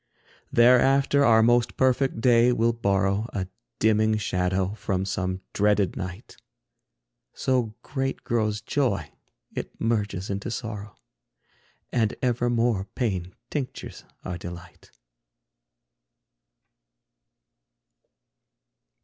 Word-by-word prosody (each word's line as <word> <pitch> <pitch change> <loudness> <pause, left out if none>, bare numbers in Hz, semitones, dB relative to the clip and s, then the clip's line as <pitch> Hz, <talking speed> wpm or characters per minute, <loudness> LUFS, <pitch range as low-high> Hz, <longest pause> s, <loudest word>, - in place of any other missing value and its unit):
Thereafter 135 +4 +5
our 110 -3 +6
most 120 0 +2
perfect 130 -2 +2
day 120 0 +5
will 115 -1 +2
borrow 100 -1 +1
A 95 -2 -2 0.3
dimming 110 0 +3
shadow 95 -1 0
from 95 -3 -2
some 95 0 -2
dreaded 105 -3 +2
night. 95 +3 -7 1.0
So 125 -5 0
great 135 -1 -3
grows 110 -3 0
joy - - -1 0.4
it - - -6
merges 105 -4 -1
into 100 +4 -3
sorrow, 110 -3 -6 1.0
And 110 -3 +1
evermore 120 -4 +1
pain 95 -7 -2 0.2
tinctures 140 -4 -5 0.2
our 90 -2 -4
delight. 85 0 -10
110 Hz, 90 wpm, -25 LUFS, 95-120 Hz, 1.0 s, our